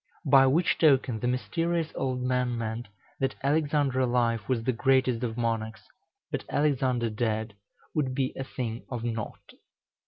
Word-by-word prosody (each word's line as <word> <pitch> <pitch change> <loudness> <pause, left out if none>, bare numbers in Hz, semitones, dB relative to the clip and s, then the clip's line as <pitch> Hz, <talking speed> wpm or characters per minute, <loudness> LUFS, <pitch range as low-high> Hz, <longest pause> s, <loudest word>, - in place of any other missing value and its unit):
By 135 -1 +6
which 160 +7 +2
token 135 -7 +4
the 120 - -1
mysterious 165 +6 -1
old 130 -1 -2
man 125 -1 0
meant, 115 0 -4 0.3
that 135 - 0
Alexander 145 -2 +1
alive 120 -3 +2
was 120 -3 +1
the 130 - +1
greatest 130 -1 +2
of 115 -1 -3
monarchs, 115 -1 -2 0.5
but - - -2
Alexander 130 -5 +1
dead 110 -1 -1 0.4
would 135 -4 0
be 130 -1 0
a 135 - -3
thing 120 -3 -5
of 120 -3 -4
nought. 115 -2 -5
125 Hz, 150 wpm, -28 LUFS, 115-135 Hz, 0.5 s, By